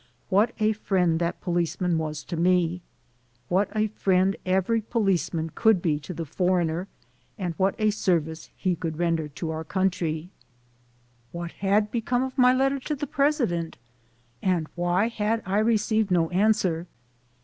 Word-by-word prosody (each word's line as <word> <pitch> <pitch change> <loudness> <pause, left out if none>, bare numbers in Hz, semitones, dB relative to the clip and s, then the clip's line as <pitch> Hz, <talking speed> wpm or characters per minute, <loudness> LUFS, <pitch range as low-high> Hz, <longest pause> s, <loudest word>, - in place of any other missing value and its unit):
What 210 +5 +3
a 215 0 +3
friend 180 -6 +1
that 170 0 -2
policeman 175 -1 0
was 155 -1 -4
to 175 - -5
me! 175 0 +2 0.7
What 195 +3 +2
a 215 0 +2
friend 190 -1 +2
every 190 +5 +2
policeman 180 - 0
could 220 -4 +4
be 155 -4 0
to 150 +4 -9
the 165 -1 -4
"foreigner" 175 +2 0 0.5
and 180 -4 -3
what 190 0 +2
a 215 -2 +2
service 160 -6 -1
he 185 -2 0
could 160 -2 -4
render 165 -2 0
to 160 +3 -5
our 160 0 -4
country! 175 -2 -1 1.0
What 170 0 -5
had 205 +2 +1
become 245 +2 0
of 260 -1 -4
my 250 -2 +6
letter 270 +2 +2
to 300 +3 -3
the 290 - -3
president 260 - 0 0.6
and 175 -4 +1
why 175 +4 +1
had 225 0 -1
I 195 +3 +1
received 220 -1 +2
no 170 -2 +2
answer? 185 -4 +1
185 Hz, 150 wpm, -26 LUFS, 170-215 Hz, 1.0 s, my